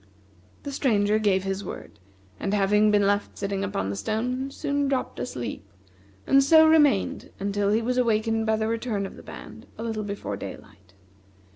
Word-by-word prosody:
The 285 - -5
Stranger 215 -6 +2
gave 195 -3 +2
his 195 +1 -3
word, 105 - -9 0.4
and 200 +1 -1
having 210 +1 +3
been 205 -1 +3
left 205 +1 0
sitting 200 -1 -2
upon 195 - -2
the - - -3
stone, 250 - -2
soon 285 0 -1
dropped 270 -2 -2
asleep, 120 - -5 0.6
and 275 0 +5
so 315 +3 +7
remained 295 -10 +3
until 200 0 0
he 220 +2 +2
was 250 +2 0
awakened 225 -1 +1
by 220 - +3
the 220 0 -1
return 225 -3 -2
of - - -8
the - - -12
band, - - -11
a 225 - -5
little 220 -2 -3
before 200 0 -5
daylight. 95 -1 -11
215 Hz, 170 wpm, -25 LUFS, 200-250 Hz, 0.6 s, so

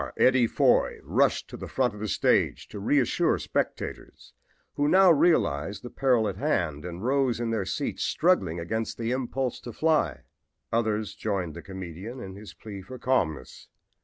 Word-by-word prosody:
Eddie 125 -2 +4
Foy - - +3
rushed - - +1
to - - -9
the - - -7
front 125 -4 0
of 105 - -10
the 110 - -3
stage 95 - +1
to 105 - -7
reassure 125 +5 +2
the - - -5
spectators, - - -4 0.4
who 145 0 +1
now 185 +2 +6
realized 125 - +2
the 120 - -8
peril 125 -5 +2
at 95 -2 -4
hand 75 -7 -1
and 90 +2 -6
rose 130 -2 +1
in 120 -1 -1
their 110 -4 -1
seats 95 - -3
struggling 95 - +1
against 110 +7 -3
the 115 0 -2
impulse 130 0 -2
to 120 - -8
fly. 155 +5 +1 0.5
Others 110 -2 0
joined 100 -6 -2
the - - -8
comedian 95 +5 -8
in 95 -4 -7
his 105 +2 -11
plea 100 -3 -9
for 115 +7 -9
calmness. 90 - -1
110 Hz, 170 wpm, -27 LUFS, 95-130 Hz, 0.5 s, now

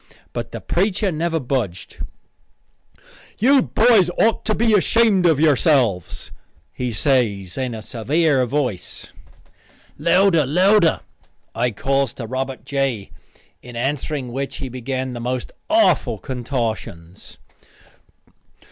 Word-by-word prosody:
But - - -5
the - - -6
preacher 195 +2 0
never 165 +1 -1
budged. 120 - -3 1.4
"You 265 +5 +5
boys 220 -7 +4
otter 220 -1 +2
be 225 -1 +2
ashamed 205 -2 +4
of 160 -4 +3
yourselves," 135 - +2 0.4
he 125 -1 -3
says 105 - 0
in 130 -3 -3
a 110 - -8
severe 135 +3 +1
voice. 125 -7 -3 0.9
"Louder, 170 -4 +3
louder," 180 +3 +3 0.5
I 120 +2 0
calls 135 +3 -1
to 120 - -6
Robert 130 +2 -4
J., 135 -7 -2 0.5
in 125 -1 -11
answering 135 +1 -2
which 135 +2 -4
he 135 -3 -5
began 130 +1 -4
the 120 - -6
most 125 +1 -3 0.2
awful 320 - +3
contortions. 115 - -5
135 Hz, 110 wpm, -21 LUFS, 120-170 Hz, 1.4 s, You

